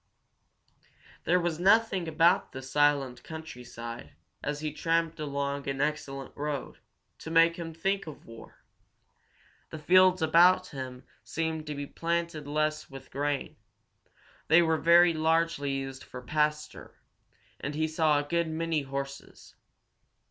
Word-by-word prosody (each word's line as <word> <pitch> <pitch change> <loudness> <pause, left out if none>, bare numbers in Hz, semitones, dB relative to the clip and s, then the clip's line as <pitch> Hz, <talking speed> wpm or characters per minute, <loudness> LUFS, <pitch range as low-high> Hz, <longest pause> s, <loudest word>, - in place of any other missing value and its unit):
There 180 +2 +3
was 170 -2 -2
nothing 195 -2 +3
about 165 +2 +3
the 130 - -7
silent 140 -2 +1
countryside, 120 -7 -9 0.3
as 145 0 -3
he 155 -1 -3
tramped 165 0 0
along 140 -1 -3
an 135 0 -3
excellent 140 -2 -3
road, 145 -2 -4 0.4
to - - -8
make 165 +1 +5
him 165 -1 -5
think 195 +3 -2
of 155 - -10
war. 115 0 -14 1.1
The - - -7
fields 185 +3 +4
about 175 +3 +5
him 130 -3 -7 0.2
seemed 160 +5 -3
to 150 - -4
be 145 0 -4
planted 170 -1 -3
less 155 +1 -1
with 135 -1 -11
grain; 145 +1 -2 0.9
they 165 +2 +6
were 160 -1 +2
very 170 +1 +6
largely 160 -2 +1
used 135 -1 -5
for 125 0 -10
pasture, 150 +2 -2 0.6
and 140 +2 -4
he 155 +1 0
saw 155 -1 +2
a 145 - 0
good 170 +3 0
many 160 -1 -1
horses. 140 0 -7
155 Hz, 135 wpm, -29 LUFS, 140-165 Hz, 1.1 s, they